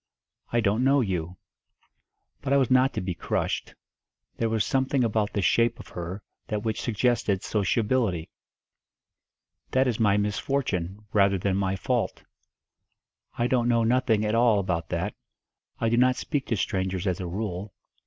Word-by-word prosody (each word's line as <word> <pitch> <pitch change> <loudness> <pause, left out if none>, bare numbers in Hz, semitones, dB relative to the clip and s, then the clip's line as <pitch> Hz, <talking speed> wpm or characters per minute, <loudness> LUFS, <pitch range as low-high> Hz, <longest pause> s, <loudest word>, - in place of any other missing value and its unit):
"I 120 - +2
don't 110 +3 +1
know 135 +1 +4
you." 90 -4 -3 1.0
But 135 - -1
I - - +5
was 130 -2 +2
not 130 +1 +5
to - - -1
be 90 -1 -2
crushed; - - -2 0.6
there 115 - 0
was 110 -2 +1
something 135 0 +1
about 110 -2 0
the 100 - 0
shape 115 +5 +2
of - - -11
her 90 +4 -6 0.2
that 105 -1 -2
which 110 -2 -2
suggested 115 -4 +1
sociability. 105 -3 0 1.4
"That 130 +1 +3
is 120 -3 -1
my 105 -2 +4
misfortune, 105 -3 -2
rather 100 -1 +4
than 95 +1 0
my 95 -1 0
fault." - - -1 1.1
"I 120 - +1
don't 120 -1 +2
know 115 -1 +3
nothing 115 -2 +2
at 105 - 0
all 115 -2 +4
about 90 -5 -1
that. - - -2 0.7
I 115 - +1
do 115 +1 +2
not 125 +1 +4
speak 140 +1 -3
to 115 - 0
strangers 95 0 -1
as 90 -3 0
a 90 - -4
rule. 95 +1 -4
110 Hz, 160 wpm, -26 LUFS, 95-120 Hz, 1.4 s, I